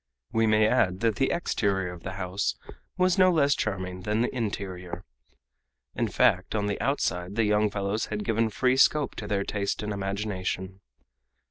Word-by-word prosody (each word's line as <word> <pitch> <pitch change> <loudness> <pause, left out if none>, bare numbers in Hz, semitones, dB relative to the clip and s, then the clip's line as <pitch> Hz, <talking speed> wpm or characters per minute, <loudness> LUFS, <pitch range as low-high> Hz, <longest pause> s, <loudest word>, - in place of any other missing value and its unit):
We 115 -1 +2
may 110 0 +4
add 110 -6 +2
that 115 -2 +1
the 135 +1 +2
exterior 100 - 0
of 85 - -11
the 95 - -6
house 95 +1 -2 0.4
was 185 0 +2
no 185 0 +6
less 145 -4 +3
charming 95 -5 -3
than 105 +4 0
the 125 - -1
interior. 95 -5 -4 0.9
In - - 0
fact, - - +2
on 105 -1 0
the 100 -1 -2
outside 95 - -1
the 115 - +2
young 105 0 +3
fellows 100 +1 -2
had 105 -1 -4
given 115 0 +1
free 125 +4 +1
scope 145 0 +4
to 105 - -5
their 100 -1 0
taste 100 +1 -2
and 105 0 -2
imagination. 95 -1 -3
105 Hz, 170 wpm, -27 LUFS, 95-115 Hz, 0.9 s, no